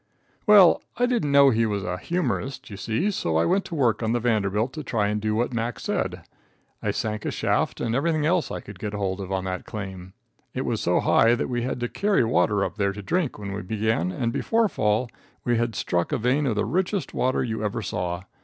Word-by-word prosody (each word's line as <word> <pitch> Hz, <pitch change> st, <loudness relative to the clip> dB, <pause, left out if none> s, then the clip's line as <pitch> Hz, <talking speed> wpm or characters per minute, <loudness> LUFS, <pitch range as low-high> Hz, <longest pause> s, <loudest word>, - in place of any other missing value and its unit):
Well, 200 Hz, -4 st, +7 dB, 0.2 s
I 245 Hz, -, +3 dB
didn't 240 Hz, -, 0 dB
know 140 Hz, -1 st, +7 dB
he 115 Hz, -1 st, +2 dB
was 100 Hz, -2 st, -2 dB
"an 90 Hz, 0 st, -3 dB
humorist," 135 Hz, -, -2 dB
you -, -, -6 dB
see, 115 Hz, -, 0 dB
so 80 Hz, -, -1 dB
I 80 Hz, -, +3 dB
went 190 Hz, +2 st, +1 dB
to 170 Hz, -, -6 dB
work 120 Hz, -7 st, +2 dB
on 110 Hz, 0 st, 0 dB
the 120 Hz, -, +1 dB
Vanderbilt 110 Hz, 0 st, 0 dB
to 155 Hz, -, -5 dB
try 105 Hz, -5 st, 0 dB
and 105 Hz, 0 st, -1 dB
do 110 Hz, 0 st, 0 dB
what 120 Hz, +2 st, 0 dB
Mac. 115 Hz, 0 st, -2 dB
said. -, -, -2 dB, 0.6 s
I -, -, -1 dB
sank 110 Hz, -1 st, -2 dB
a -, -, -1 dB
shaft -, -, 0 dB
and 115 Hz, -1 st, -1 dB
everything 155 Hz, +3 st, +1 dB
else 170 Hz, +1 st, +2 dB
I -, -, -5 dB
could 100 Hz, -3 st, -11 dB
get 105 Hz, 0 st, -4 dB
hold 100 Hz, -1 st, -2 dB
of 95 Hz, 0 st, -6 dB
on 95 Hz, -1 st, -1 dB
that 95 Hz, -1 st, -4 dB
claim. 95 Hz, -3 st, -7 dB, 0.4 s
It 130 Hz, -, -2 dB
was 115 Hz, -3 st, -1 dB
so 90 Hz, -, +2 dB
high 115 Hz, +1 st, +4 dB
that 120 Hz, -, -2 dB
we 120 Hz, -1 st, -1 dB
had 125 Hz, +1 st, -2 dB
to 120 Hz, -, 0 dB
carry 200 Hz, -, +1 dB
water 105 Hz, -3 st, +2 dB
up -, -, -6 dB
there 100 Hz, -2 st, +1 dB
to 105 Hz, 0 st, -8 dB
drink 170 Hz, -, -1 dB
when 100 Hz, -1 st, -6 dB
we 100 Hz, -, -4 dB
began 105 Hz, -3 st, 0 dB
and 115 Hz, +4 st, -2 dB
before 225 Hz, +9 st, +2 dB
fall 110 Hz, -, +1 dB, 0.4 s
we 120 Hz, -1 st, +2 dB
had 115 Hz, -1 st, -1 dB
struck 85 Hz, -1 st, -1 dB
a -, -, +1 dB
vein 130 Hz, +5 st, +1 dB
of 115 Hz, -, 0 dB
the 105 Hz, -, 0 dB
richest 190 Hz, +2 st, -1 dB
water 130 Hz, +1 st, +1 dB
you 110 Hz, -3 st, -3 dB
ever 110 Hz, +2 st, -2 dB
saw. 90 Hz, -1 st, -3 dB
115 Hz, 235 wpm, -25 LUFS, 100-135 Hz, 0.6 s, Well